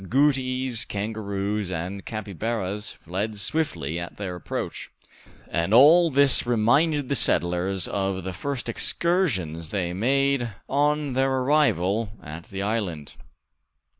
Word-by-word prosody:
Agouties, 130 0 +1
kangaroos, 100 -2 -3
and 95 +3 -4
capybaras 105 -1 -3
fled 100 +5 -4
swiftly 95 - -2
at 85 - -7
their 95 -3 -4
approach; 90 - -5 0.6
and 85 +6 +1
all 165 +7 +7
this 140 -1 +3
reminded 140 +6 +2
the 140 - 0
settlers 90 -3 +2
of 95 -2 -2
the 95 0 -4
first 135 +7 -4
excursions 115 - 0
they 95 -3 -1
had 90 - -5
made 135 0 +1
on 145 0 +1
their 135 +1 +2
arrival 115 - +1
at 80 +3 -8
the 95 0 -5
island. 100 -9 -3
110 Hz, 120 wpm, -25 LUFS, 95-135 Hz, 0.6 s, all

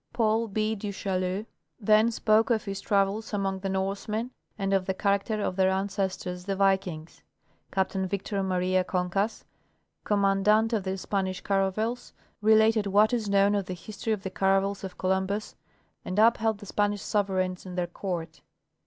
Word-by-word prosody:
Paul 225 -1 +1
B. 215 +1 0
du 205 -1 -4
Chaillu 190 +1 -2 0.3
then 215 +1 +4
spoke 220 0 +2
of 235 -1 +1
his 195 -1 -4
travels 205 +2 0
among 195 -1 -1
the 195 0 -3
Norsemen 200 +5 -2 0.3
and 195 -1 -1
of 190 -1 +1
the 190 - -1
character 200 +2 0
of 185 - -1
their 190 0 +3
ancestors, 190 -2 -2
the 195 0 -1
Vikings. 190 -5 0 0.5
Captain 190 0 0
Victor 200 +1 -2
Maria 185 0 +1
Concas, 185 +4 -1 0.6
commandant 210 +2 +3
of 205 -4 0
the 190 0 -2
Spanish 190 -1 -2
caravels, 205 +5 -1 0.3
related 220 0 +4
what 210 +4 +4
is 225 -4 -1
known 200 +1 +4
of 200 -2 -1
the 185 - -4
histor}' 210 +5 -5
of 205 - -4
the 190 - -4
caravels 195 +1 +1
of 190 -2 -7
Columbus, 190 +3 -1 0.5
and 185 - -4
upheld 225 0 +4
the 205 - -11
Spanish 205 +1 0
sovereigns 190 -3 -1
and 180 0 -7
their 180 - +1
court. 175 -2 -5
195 Hz, 160 wpm, -27 LUFS, 190-215 Hz, 0.6 s, then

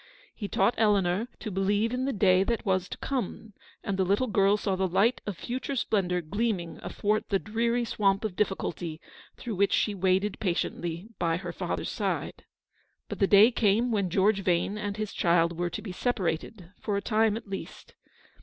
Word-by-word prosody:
He 205 - -5
taught 230 - +2
Eleanor 205 -1 +2
to 215 - -6
believe 205 +4 +1
in 255 +1 -1
the 275 - 0
day 190 -4 +4
that 235 0 -2
was 185 -2 0
to - - -6
come, 225 -4 -4 0.3
and 195 -1 -2
the - - +4
little 200 +7 +2
girl 200 -2 +3
saw 195 -2 -1
the 190 0 0
light 210 +7 +2
of 200 -4 -3
future 260 +3 -4
splendour 185 -7 0
gleam 205 +5 -1
ing 170 -1 -8
athwart 210 +1 -1
the 200 - +3
dreary 235 +4 0
swamp 200 -1 +1
of 200 -4 -3
difficulty 175 -5 -2 0.4
through 235 - -5
which 200 +1 +3
she 210 - +2
waded 190 +1 +1
patiently 175 0 -2
by 165 -1 +1
her 185 - -6
father's - - -3
side. - - -3 0.6
But - - -5
the 195 - +4
day 210 +5 +7
came 230 +2 +2
when 200 -4 0
George 195 +2 +2
Yane 185 +2 +1
and 205 -1 -4
his 215 -1 -4
child 170 0 +2
were 175 +1 -1
to - - -6
be 205 - -6
separated, 180 -3 -2
for 205 -2 -1
a - - -1
time 220 -1 +2
at 225 - -10
least. 195 -1 -8
200 Hz, 190 wpm, -28 LUFS, 185-220 Hz, 0.6 s, day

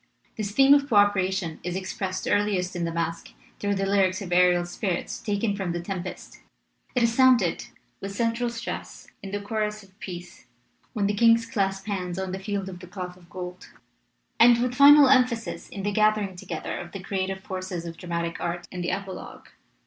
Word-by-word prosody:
This 215 -2 -3
theme 270 +6 +6
of 285 0 +3
co 225 - +1
opera 205 -2 +4
tion 175 -5 -3
is 180 0 -4
expressed 185 0 -4
earliest 195 -3 +1
in 170 -1 -1
the 165 - -2
masque 165 0 -3 0.3
through 205 0 0
the 195 0 -1
lyric 195 -1 +2
of 185 -3 -6
Ariel's 175 -1 +4
Spirits 180 -2 -3
taken 205 0 -1
from 190 -4 -3
The 175 - -2
Tem 185 +1 -4
pest; 185 0 -9 0.6
it 250 - +3
is 230 -1 +3
sounded, 245 -8 +4 0.3
with 195 - -5
central 230 +3 0
stress, 235 0 -7
in 195 - -7
the 205 +1 -3
chorus 210 0 -3
of 195 +1 -22
peace 175 -1 -9 0.5
when 210 -4 0
the 205 - +1
kings 230 +1 +4
clasp 195 -2 -1
hands 185 -4 -3
on 190 -1 -3
the 190 - -4
Field 195 0 -3
of 180 -2 -8
the 180 - -11
Cloth 180 -1 -6
of 175 -2 -20
Gold; 180 0 -7 0.7
and, 235 0 +7
with 250 +1 0
final 285 +2 +8
emphasis, 250 -3 +2
in 195 - -6
the 205 - 0
gathering 215 -2 +2
together 175 -2 -5
of 175 0 -9
the 195 - -5
creative 190 0 -2
forces 185 -3 -5
of 165 -1 -6
dramatic 170 -1 -3
art 175 0 -3
in 180 - -5
the 175 - -1
Epilogue. 195 -2 -6
195 Hz, 195 wpm, -26 LUFS, 180-215 Hz, 0.7 s, final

